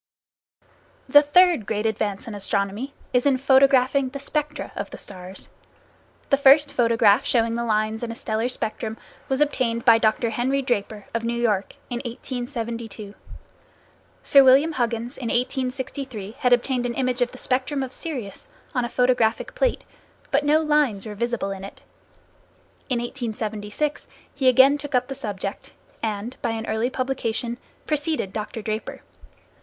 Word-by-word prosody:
The 290 Hz, +2 st, +8 dB
third 310 Hz, -, +4 dB
great 215 Hz, 0 st, -1 dB
advance 210 Hz, -2 st, -2 dB
in 225 Hz, -, -6 dB
astronomy 205 Hz, +6 st, -2 dB, 0.2 s
is 250 Hz, +2 st, +3 dB
in 270 Hz, -2 st, +3 dB
photographing 265 Hz, 0 st, +4 dB
the 280 Hz, -, -7 dB
spectra 295 Hz, +1 st, -3 dB
of 200 Hz, -, -4 dB
the -, -, -9 dB
stars. 185 Hz, -1 st, -9 dB, 0.8 s
The 275 Hz, -, +5 dB
first 285 Hz, +1 st, +6 dB
photograph 230 Hz, -1 st, +4 dB
showing 230 Hz, -2 st, +2 dB
the 235 Hz, +1 st, -1 dB
lines 215 Hz, -1 st, 0 dB
in 235 Hz, -1 st, -3 dB
a -, -, -6 dB
stellar 225 Hz, -1 st, -2 dB
spectrum 220 Hz, -2 st, -3 dB, 0.3 s
was 265 Hz, +1 st, 0 dB
obtained 245 Hz, -5 st, 0 dB
by 230 Hz, -2 st, +7 dB
Dr. 225 Hz, +1 st, +1 dB
Henry 260 Hz, +5 st, 0 dB
Draper, 215 Hz, -4 st, -2 dB
of 230 Hz, 0 st, -1 dB
New 235 Hz, +1 st, -1 dB
York, 210 Hz, -5 st, 0 dB, 0.2 s
in 240 Hz, -, -1 dB
1872. 235 Hz, -4 st, -5 dB, 1.1 s
Sir 275 Hz, -1 st, +7 dB
William 270 Hz, +5 st, +6 dB
Huggins 240 Hz, -2 st, -2 dB
in 245 Hz, -, -4 dB
1863 255 Hz, -3 st, -3 dB
had 250 Hz, -, +2 dB
obtained 245 Hz, 0 st, +2 dB
an 235 Hz, -, -4 dB
image 255 Hz, -1 st, -1 dB
of 245 Hz, -, +1 dB
the 255 Hz, -, -11 dB
spectrum 260 Hz, +2 st, -1 dB
of 260 Hz, -1 st, -6 dB
Sirius, 250 Hz, -, -6 dB, 0.2 s
on 250 Hz, -, 0 dB
a 240 Hz, -, -2 dB
photographic 245 Hz, -2 st, +1 dB
plate, -, -, 0 dB, 0.5 s
but 280 Hz, +1 st, +2 dB
no 300 Hz, +2 st, +4 dB
lines 295 Hz, -10 st, +1 dB
were 215 Hz, -, -6 dB
visible 235 Hz, -2 st, -2 dB
in 195 Hz, -1 st, -6 dB
it. 195 Hz, -, -9 dB, 1.1 s
In 250 Hz, -, +1 dB
1876 230 Hz, +2 st, -3 dB, 0.3 s
he 270 Hz, -2 st, 0 dB
again 265 Hz, +3 st, +6 dB
took 290 Hz, -1 st, -4 dB
up 250 Hz, +1 st, +1 dB
the -, -, -3 dB
subject, 205 Hz, -6 st, -6 dB, 0.3 s
and, 220 Hz, +2 st, -3 dB
by 240 Hz, -, -1 dB
an 225 Hz, 0 st, -4 dB
early 220 Hz, +3 st, 0 dB
publication, 250 Hz, -2 st, -2 dB, 0.3 s
preceded 300 Hz, -, -1 dB
Dr. 215 Hz, 0 st, -5 dB
Draper. 215 Hz, +1 st, -4 dB
240 Hz, 155 wpm, -23 LUFS, 220-270 Hz, 1.1 s, The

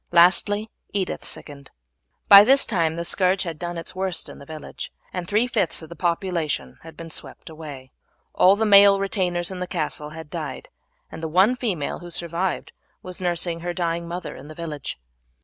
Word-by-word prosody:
Lastly 205 Hz, +5 st, +4 dB, 0.2 s
Edith 195 Hz, -2 st, -2 dB
sickened. 140 Hz, -2 st, -7 dB, 0.6 s
By 200 Hz, 0 st, +11 dB
this 270 Hz, +5 st, +5 dB
time 160 Hz, -2 st, 0 dB
the 170 Hz, 0 st, -3 dB
scourge 185 Hz, +2 st, +2 dB
had 165 Hz, -4 st, -6 dB
done 175 Hz, -1 st, -4 dB
its 165 Hz, -, -3 dB
worst 185 Hz, -2 st, -1 dB
in -, -, -11 dB
the 140 Hz, -, -13 dB
village, 155 Hz, -2 st, -7 dB, 0.2 s
and 180 Hz, -2 st, -4 dB
three 210 Hz, +5 st, +2 dB
fifths 210 Hz, -9 st, -1 dB
of 160 Hz, -, -11 dB
the 170 Hz, -, -9 dB
population 170 Hz, -3 st, -2 dB
had 165 Hz, 0 st, -13 dB
been 165 Hz, -1 st, -8 dB
swept 160 Hz, -, -7 dB
away. 145 Hz, -5 st, -9 dB, 0.4 s
All 190 Hz, +2 st, +6 dB
the 220 Hz, +2 st, 0 dB
male 200 Hz, -1 st, +7 dB
retainers 180 Hz, -3 st, -1 dB
in 185 Hz, -, -6 dB
the 180 Hz, -, -3 dB
castle 150 Hz, -4 st, -3 dB
had 155 Hz, -1 st, -10 dB
died, 150 Hz, -6 st, -6 dB, 0.4 s
and -, -, -8 dB
the 160 Hz, -, -2 dB
one 190 Hz, +9 st, +4 dB
female 200 Hz, -, -2 dB
who 175 Hz, -, -9 dB
survived 170 Hz, +2 st, -2 dB, 0.3 s
was 185 Hz, 0 st, -7 dB
nursing 175 Hz, -1 st, -1 dB
her 175 Hz, +1 st, -4 dB
dying 170 Hz, -1 st, -1 dB
mother 175 Hz, +2 st, -5 dB
in 140 Hz, -, -11 dB
the 155 Hz, -, -10 dB
village. 150 Hz, -, -5 dB
175 Hz, 185 wpm, -23 LUFS, 160-190 Hz, 0.6 s, By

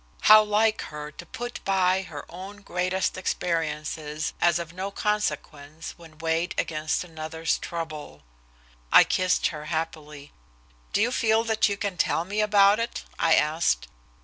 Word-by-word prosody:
How 215 Hz, 0 st, +9 dB
like 215 Hz, +1 st, +2 dB
her 150 Hz, 0 st, -7 dB
to -, -, -11 dB
put 240 Hz, +1 st, -6 dB
by 190 Hz, -1 st, +2 dB
her 155 Hz, -6 st, -8 dB
own 195 Hz, +4 st, -9 dB
greatest 185 Hz, 0 st, -1 dB
experiences 155 Hz, -3 st, -2 dB
as 170 Hz, -1 st, +4 dB
of 170 Hz, -1 st, -6 dB
no 190 Hz, +2 st, -4 dB
consequence 155 Hz, -7 st, -3 dB
when 165 Hz, -2 st, -16 dB
weighed 165 Hz, +2 st, -1 dB
against 155 Hz, +1 st, -1 dB
another's 160 Hz, -1 st, -3 dB
trouble! 160 Hz, -3 st, -6 dB, 0.7 s
I -, -, +9 dB
kissed 185 Hz, 0 st, +1 dB
her 150 Hz, 0 st, -7 dB
happily. 155 Hz, -2 st, -5 dB, 0.6 s
"Do 210 Hz, -, +2 dB
you 245 Hz, -, +1 dB
feel 225 Hz, -3 st, +2 dB
that 220 Hz, -2 st, +2 dB
you 200 Hz, -, -2 dB
can 200 Hz, -3 st, -3 dB
tell 165 Hz, -, +1 dB
me 205 Hz, +3 st, -1 dB
about 205 Hz, 0 st, +5 dB
it?" 230 Hz, -, -3 dB, 0.2 s
I 165 Hz, -1 st, +5 dB
asked. 150 Hz, -, +1 dB
170 Hz, 150 wpm, -26 LUFS, 155-200 Hz, 0.7 s, How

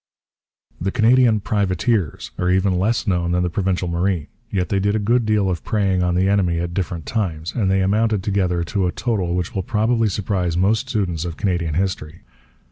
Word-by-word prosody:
The 95 Hz, -, 0 dB
Canadian 120 Hz, -1 st, +4 dB
privateers 100 Hz, -, -1 dB
are 90 Hz, -, +1 dB
even 95 Hz, 0 st, +2 dB
less 115 Hz, +6 st, 0 dB
known 90 Hz, -4 st, 0 dB
than 90 Hz, 0 st, +1 dB
the 90 Hz, -, -1 dB
Provincial 95 Hz, 0 st, -1 dB
Marine. 85 Hz, -1 st, 0 dB, 0.2 s
Yet 90 Hz, -4 st, -1 dB
they 100 Hz, -, +1 dB
did 100 Hz, +2 st, +1 dB
a -, -, +3 dB
good 115 Hz, +2 st, +1 dB
deal 105 Hz, -2 st, +2 dB
of 90 Hz, -3 st, -2 dB
preying 95 Hz, -4 st, +1 dB
on 90 Hz, -1 st, +1 dB
the 95 Hz, +2 st, +2 dB
enemy 95 Hz, -4 st, +2 dB
at 85 Hz, 0 st, -3 dB
different 85 Hz, -3 st, -3 dB
times, 85 Hz, -7 st, -2 dB
and 105 Hz, -6 st, 0 dB
they 95 Hz, 0 st, +2 dB
amounted 105 Hz, +1 st, +1 dB
altogether 90 Hz, -3 st, 0 dB
to 95 Hz, +1 st, -1 dB
a -, -, -1 dB
total 105 Hz, -6 st, -1 dB
which 90 Hz, 0 st, -2 dB
will 95 Hz, -, -1 dB
probably 110 Hz, +3 st, +1 dB
surprise 95 Hz, -3 st, -1 dB
most 105 Hz, +4 st, +1 dB
students 90 Hz, -7 st, -1 dB
of 85 Hz, -2 st, -5 dB
Canadian 85 Hz, -5 st, -1 dB
history. 90 Hz, -3 st, -3 dB
95 Hz, 195 wpm, -21 LUFS, 90-105 Hz, 0.2 s, Canadian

